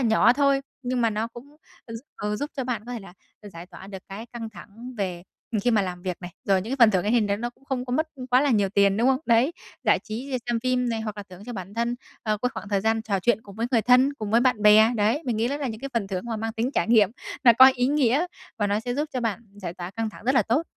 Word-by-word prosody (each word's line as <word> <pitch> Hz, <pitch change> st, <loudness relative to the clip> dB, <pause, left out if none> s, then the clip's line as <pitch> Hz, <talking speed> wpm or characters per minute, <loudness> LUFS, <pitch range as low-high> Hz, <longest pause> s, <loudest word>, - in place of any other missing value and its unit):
nhỏ 230 Hz, -1 st, +4 dB
thôi 275 Hz, 0 st, +2 dB, 0.2 s
nhưng 250 Hz, 0 st, -1 dB
mà 230 Hz, -1 st, +3 dB
nó 215 Hz, +2 st, -2 dB
cũng 270 Hz, +6 st, -13 dB, 0.3 s
gi 225 Hz, -, -7 dB, 0.2 s
ừ, 210 Hz, 0 st, -2 dB
giúp 290 Hz, +5 st, -4 dB
cho 265 Hz, -, -2 dB
bạn 235 Hz, -4 st, -3 dB
có 245 Hz, -, -6 dB
thể 235 Hz, -, -5 dB
là 195 Hz, -3 st, -12 dB, 0.3 s
được 205 Hz, -, -9 dB
giải 170 Hz, +1 st, -9 dB
tỏa 190 Hz, -, -12 dB
được 195 Hz, -1 st, -7 dB
cái 210 Hz, +4 st, -7 dB
căng 230 Hz, -2 st, -6 dB
thẳng 225 Hz, +6 st, -11 dB
về 180 Hz, -3 st, -3 dB, 0.4 s
khi 245 Hz, -, +2 dB
mà 215 Hz, -3 st, +3 dB
làm 180 Hz, -1 st, -5 dB
việc 185 Hz, -2 st, -3 dB
này. 175 Hz, 0 st, -7 dB
Rồi 195 Hz, -2 st, +3 dB
những 225 Hz, -, -7 dB
cái -, -, -1 dB
phần 230 Hz, -3 st, +7 dB
thưởng 185 Hz, -3 st, +1 dB
ấy 210 Hz, -, +1 dB
thì 240 Hz, -, +4 dB
đấy 200 Hz, -1 st, 0 dB
nó 240 Hz, +3 st, -4 dB
cũng 265 Hz, -, -28 dB
không 255 Hz, -2 st, -3 dB
có 245 Hz, -, -5 dB
mất 315 Hz, +4 st, 0 dB, 0.2 s
quá 250 Hz, +1 st, +5 dB
là 290 Hz, -, +2 dB
nhiều 205 Hz, -5 st, +2 dB
tiền, 200 Hz, 0 st, +3 dB
đúng 240 Hz, +4 st, +3 dB
không? 265 Hz, -1 st, +3 dB
Đấy, 240 Hz, +7 st, +3 dB, 0.3 s
giải -, -, +4 dB
trí 255 Hz, +5 st, -4 dB
xem 235 Hz, -1 st, 0 dB
phim 250 Hz, 0 st, 0 dB
này 225 Hz, -1 st, -1 dB
hoặc 215 Hz, -1 st, -5 dB
là 205 Hz, -, -6 dB
thưởng 185 Hz, +3 st, -12 dB
cho 245 Hz, -, -5 dB
bản 195 Hz, 0 st, -7 dB
thân, 235 Hz, +1 st, 0 dB, 0.3 s
ờ, 215 Hz, -1 st, 0 dB
cái 250 Hz, -, +2 dB
khoảng 195 Hz, -, -7 dB
thời 200 Hz, -2 st, +1 dB
gian 220 Hz, +1 st, +1 dB
trò 200 Hz, -4 st, -1 dB
chuyện 225 Hz, +2 st, +1 dB
cùng 200 Hz, -1 st, -13 dB
với 230 Hz, +1 st, -1 dB
người 230 Hz, -4 st, +3 dB
thân, 255 Hz, +3 st, +5 dB
cùng 215 Hz, -5 st, -5 dB
với 230 Hz, +2 st, +4 dB
bạn 250 Hz, -4 st, +2 dB
bè, 215 Hz, +2 st, +7 dB
đấy. 220 Hz, +9 st, +1 dB
Mình 240 Hz, -4 st, -1 dB
nghĩ 230 Hz, +2 st, +1 dB
đó 285 Hz, -, -2 dB
là 285 Hz, -2 st, -3 dB
những 220 Hz, -1 st, -6 dB
cái 275 Hz, -, -5 dB
phần 215 Hz, -4 st, 0 dB
thưởng 185 Hz, 0 st, -4 dB
mà 225 Hz, -2 st, -3 dB
mang 225 Hz, +1 st, -3 dB
tính 235 Hz, +3 st, -1 dB
trải -, -, 0 dB
nghiệm 215 Hz, -4 st, +5 dB, 0.3 s
nó 235 Hz, -, +9 dB
có 260 Hz, 0 st, +10 dB
ý 245 Hz, 0 st, +1 dB
nghĩa 285 Hz, +3 st, +2 dB, 0.3 s
và 205 Hz, -, +1 dB
nó 205 Hz, +2 st, 0 dB
sẽ 245 Hz, +1 st, -3 dB
giúp 295 Hz, +2 st, -1 dB
cho 255 Hz, -, -2 dB
bạn 230 Hz, -1 st, -2 dB, 0.2 s
giải 175 Hz, -4 st, -6 dB
tỏa 175 Hz, +1 st, -6 dB
căng 225 Hz, +1 st, -3 dB
thẳng 215 Hz, -, -14 dB
rất 260 Hz, +2 st, +2 dB
là -, -, +5 dB
tốt. 250 Hz, +8 st, +1 dB
225 Hz, 300 wpm, -25 LUFS, 205-250 Hz, 0.4 s, có